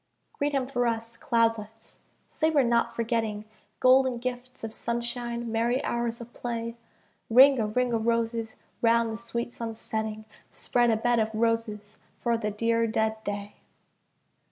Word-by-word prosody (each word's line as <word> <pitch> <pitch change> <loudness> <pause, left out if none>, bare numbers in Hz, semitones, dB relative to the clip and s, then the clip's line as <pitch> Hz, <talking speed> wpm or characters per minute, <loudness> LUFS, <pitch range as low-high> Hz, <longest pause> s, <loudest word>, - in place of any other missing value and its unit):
Greet 290 +1 -1
him 270 -2 +1
for 245 -2 0
us, 230 0 -3
cloudlets, 225 -1 -1 0.3
say 315 - 0
we're 295 -4 +4
not 235 -1 +2
forgetting 225 -2 -1 0.3
Golden 260 -1 +5
gifts 250 +1 -5
of 225 -1 -4
sunshine, 235 0 -3
merry 235 +3 +1
hours 235 -1 -1
of 235 0 -10
play. 230 -1 -4 0.5
Ring 265 +3 +7
a 215 - +1
ring 245 +3 0
o' 230 - +2
roses 230 0 -1 0.3
round 230 0 +3
the - - -4
sweet 235 +1 -3
sun's 225 -1 -5
setting, 220 -1 -4 0.2
Spread 240 -1 +1
a 225 - +3
bed 240 +1 +2
of 220 0 +1
roses 225 -2 -1 0.2
for 235 -1 0
the 220 -2 -1
dear 230 +2 +1
dead 220 0 -1
day. 205 0 -5
230 Hz, 155 wpm, -27 LUFS, 225-240 Hz, 0.5 s, Ring